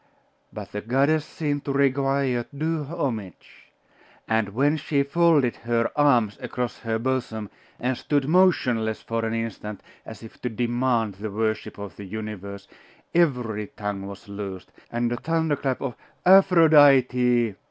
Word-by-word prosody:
But 100 -1 -8
the 105 - -4
goddess 140 +7 +2
seemed 145 -3 -3
to 140 - -1
require 135 -2 +1
due 160 0 -1
homage; 130 - -6 0.6
and 110 -2 +1
when 140 +8 +2
she 145 -2 0
folded 150 -4 +2
her 115 0 0
arms 125 -8 +3
across 125 -1 -4
her 115 -1 -2
bosom, 115 -4 -3 0.3
and 125 +1 0
stood 145 +1 -1
motionless 125 -11 +2
for 115 0 -2
an 115 0 -1
instant, 110 -2 -5 0.2
as - - -11
if 110 - -13
to 125 - -2
demand 120 -1 0
the 110 +1 -4
worship 110 +2 -2
of 100 -4 -8
the 100 - -8
universe, 100 -1 -7 0.5
every 125 -11 +1
tongue 100 -2 -5
was 100 +1 -10
loosed, 100 -2 -7 0.2
and 120 0 -1
a 120 - -1
thunder 160 0 0
clap 135 -2 -2
of 135 -3 -3 0.3
'Aphrodite! 140 - +5
120 Hz, 140 wpm, -24 LUFS, 110-140 Hz, 0.6 s, Aphrodite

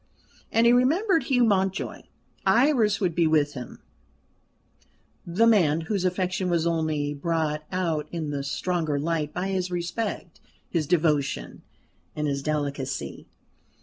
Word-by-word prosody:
And 230 +1 +3
he 235 - +6
remembered 325 - +3
Hugh 250 -3 +3
Mountjoy. 195 -3 0 0.4
Iris 235 -5 +3
would 180 -4 0
be 170 0 +2
with 150 -2 +2
him 125 -3 -9 1.4
the 185 +7 +3
man 170 -9 +4
whose 185 +3 -2
affection 185 0 -1
was 170 -2 +1
only 155 -3 0
brought 155 0 -1
out 165 -5 -1
in 160 -4 -3
the 140 -1 -2
stronger 160 +1 -1
light 155 -1 -1
by 185 +4 -3
his 185 -1 -1
respect, 175 +1 -4 0.3
his 160 -4 -1
devotion, 155 -4 0 0.5
and 150 - -2
his 140 -1 -1
delicacy. 140 - -3
170 Hz, 130 wpm, -26 LUFS, 150-195 Hz, 1.4 s, he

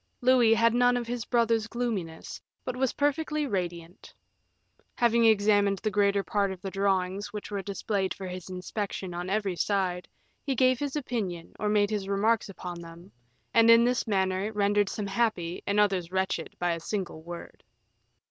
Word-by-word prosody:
Louis 245 -3 +5
had 230 0 +3
none 245 0 +4
of 240 - -3
his 235 -1 -4
brother's 230 -2 +2
gloominess, 215 -10 -4 0.2
but 255 - -3
was 260 -1 0
perfectly 300 +1 0
radiant. 175 -6 -4 0.8
Having 235 -1 +3
examined 205 -2 +4
the 215 +2 -2
greater 200 0 +2
part 200 -1 0
of 190 - -7
the 195 +1 -6
drawings 195 0 0
which 210 0 -7
were 200 -1 -2
displayed 200 -1 -2
for 195 - -7
his 180 0 -7
inspection 185 0 -4
on 175 +1 -4
every 200 -2 0
side, 185 -2 -1 0.4
he 275 -2 -1
gave 255 0 +3
his 285 -1 -3
opinion 210 - -3
or 210 - 0
made 210 0 +2
his 200 -2 -2
remarks 215 +2 +1
upon 180 -2 -7
them, 170 +2 -12 0.4
and 230 0 +6
in 230 0 +8
this 250 0 0
manner 190 0 0
rendered 205 -1 +2
some 210 - -4
happy 195 -4 -1
and 200 +1 +2
others 190 -4 +1
wretched 190 -3 -2
by 175 0 0
a 170 - -2
single 175 -2 -4
word. 170 +1 -9
205 Hz, 170 wpm, -28 LUFS, 185-230 Hz, 0.8 s, in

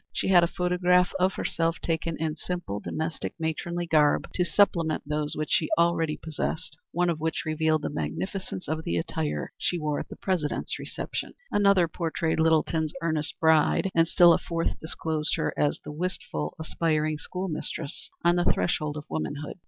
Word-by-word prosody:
She - - -1
had 175 -2 +7
a - - +4
photograph 180 +1 +2
of 185 +1 +2
herself 165 0 0
taken 165 0 -2
in 155 -1 -1
simple, 175 - -4
domestic 160 +6 -4
matronly 170 +2 -2
garb 150 -3 +3
to 180 - +1
supplement 170 -2 +2
those 150 0 -1
which 155 -1 -3
she 155 - +2
already 170 -2 +2
possessed, 160 0 -4 0.2
one 175 +1 +1
of 165 -2 0
which 160 +1 -1
revealed 155 0 +1
the - - -2
magnificence 95 - -4
of 160 +1 -2
the 85 - -1
attire 75 -3 -2
she 175 - 0
wore 150 -2 -1
at - - -6
the - - -8
President's 175 -6 -1
Reception; - - -5 0.2
another 200 -4 +4
portrayed 165 -1 -1
Littleton's 160 -1 +2
earnest 155 -3 -1
bride, 160 +4 +4
and 165 0 +4
still 175 0 +7
a - - +2
fourth 165 -1 -2
disclosed 160 -1 -2
her - - -1
as 145 - +1
the 150 - -8
wistful, 150 - -3
aspiring 155 -1 0
school 185 +5 -4
mistress 155 -1 -5 0.2
on 175 +1 +5
the 175 - +2
threshold 150 +11 +1
of 150 - -7
womanhood. 150 +2 -4
160 Hz, 170 wpm, -27 LUFS, 150-175 Hz, 0.2 s, had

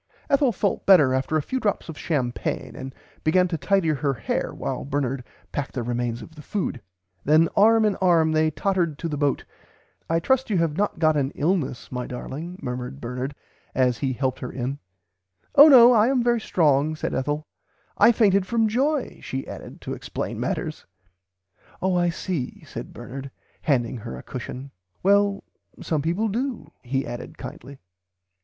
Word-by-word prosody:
Ethel 275 -2 +4
felt 200 -1 -1
better 155 -10 +7
after 130 +4 0
a 155 - -1
few 260 - -2
drops 205 -5 -1
of 160 - -7
champaigne 130 -7 -2
and 130 0 -7 0.3
began 180 +3 +3
to 170 - -1
tidy 180 +2 +1
her 145 -2 0
hair 105 - -2
while - - -4
Bernard 135 -2 -2 0.3
packed 145 - -3
the 125 - -1
remains 120 0 -2
of - - -13
the 155 - -11
food. 170 - -3 0.4
Then 155 +3 +4
arm 220 +2 +5
in 210 -2 +2
arm 170 -4 +3
they 155 0 +3
tottered 170 -2 0
to 165 - -3
the 150 - -3
boat, 145 -1 0 0.6
I 165 0 +2
trust 260 +9 +1
you 200 - +1
have 165 -3 +1
not 205 +3 0
got 155 -1 +3
an 135 -2 +1
illness 150 -6 -1
my 125 -1 -3
darling 155 +8 -6
murmured 125 - -5
Bernard 125 - -4 0.4
as 125 -2 +2
he 135 -2 0
helped 130 +1 -1
her 125 - -5
in, 130 +2 -4 0.7
Oh 290 - +10
no 250 -4 +9
I 220 -1 +5
am 260 -2 +2
very 235 -1 +2
strong 155 -5 +2
said - - -3
Ethel 145 +3 -1 0.5
I 235 - +6
fainted 200 -4 +3
from 230 -2 +2
joy 270 +5 0
she 135 0 -4
added - - -9
to - - -5
explain - - -5
matters. - - -3 0.9
Oh 185 0 +1
I 175 0 +3
see 170 -5 -4
said - - -8
Bernard 135 +2 -8 0.3
handing 125 -4 +1
her 85 - -7
a 65 - -10
cushion 135 +2 -7 0.3
well 200 +1 +3 0.4
some 155 -3 -1
people 175 +9 0
do 240 +4 -3
he 135 +2 -2
added 120 0 -7
kindly." 135 +1 -9
155 Hz, 175 wpm, -24 LUFS, 135-195 Hz, 0.9 s, Oh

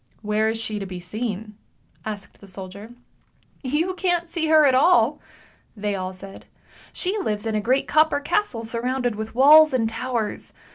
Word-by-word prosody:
" - - -35
Where 215 +1 +1
is 225 - -2
she 215 -2 -3
to 195 - -5
be 185 -1 -7
seen? 210 +2 -5 0.2
" - - -34
asked 210 -2 -7
the 200 - -13
soldier. 195 +4 -9 0.4
" - - -37 0.2
You 370 +2 -1
can't 350 -2 -1
see 320 -2 -1
her 310 -1 +6
at 270 - +4
all! 260 -2 +4 0.3
" - - -34
they 205 0 -2
all 185 -1 -3
said; 195 +1 -12 0.2
" - - -25
she 385 +4 -2
lives 210 - -3
in 225 - -1
a 215 - 0
great 255 +6 +1
copper 310 -1 +3
castle 290 - -1
surrounded 245 +1 -2
with 220 +1 -6
walls 300 +3 +7
and 225 -3 +1
towers. 225 -1 -4
230 Hz, 195 wpm, -23 LUFS, 210-290 Hz, 0.4 s, walls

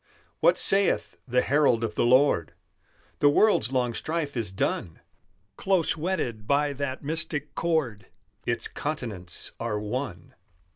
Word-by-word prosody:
What - - +4
saith 195 0 +2
the 125 0 +2
herald 140 -5 +3
of 110 -2 -2
the 120 - +1
Lord? 125 - +3 0.7
"The 145 - +5
world's 145 - +3
long 125 -2 0
strife 155 +1 -3
is 115 -5 -1
done; 85 -3 -2 0.6
Close 190 -5 +2
wedded 150 - -3
by 145 0 +2
that 135 -1 -4
mystic 150 -1 +1
cord, 145 - -1 0.4
Its - - -1
continents 110 - -5
are 115 -3 -2
one. 105 -4 -5
135 Hz, 130 wpm, -26 LUFS, 115-155 Hz, 0.7 s, The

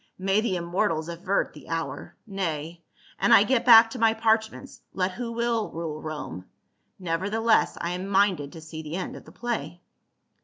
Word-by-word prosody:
May 195 +2 +1
the 215 -5 -1
immortals 170 -2 -1
avert 185 +4 -1
the 150 -4 -14
hour! 165 0 -4
Nay, 170 -5 -4 0.4
an - - +2
I 225 -3 +8
get 245 +2 +1
back 225 -1 +9
to 255 - -6
my 225 0 +3
parchments, 225 +3 -1
let 185 0 0
who 235 +4 -5
will 230 -2 -1
rule 160 -2 -5
Rome. 150 - -6 0.5
Neverthe 185 +5 -2
less 225 0 +3
I 170 - -2
am 180 +2 -4
minded 190 -7 +2
to 165 - -10
see 160 0 -8
the 155 +1 -6
end 185 - -4
of - - -11
the - - -14
play." 175 -9 -4
190 Hz, 180 wpm, -26 LUFS, 165-225 Hz, 0.5 s, back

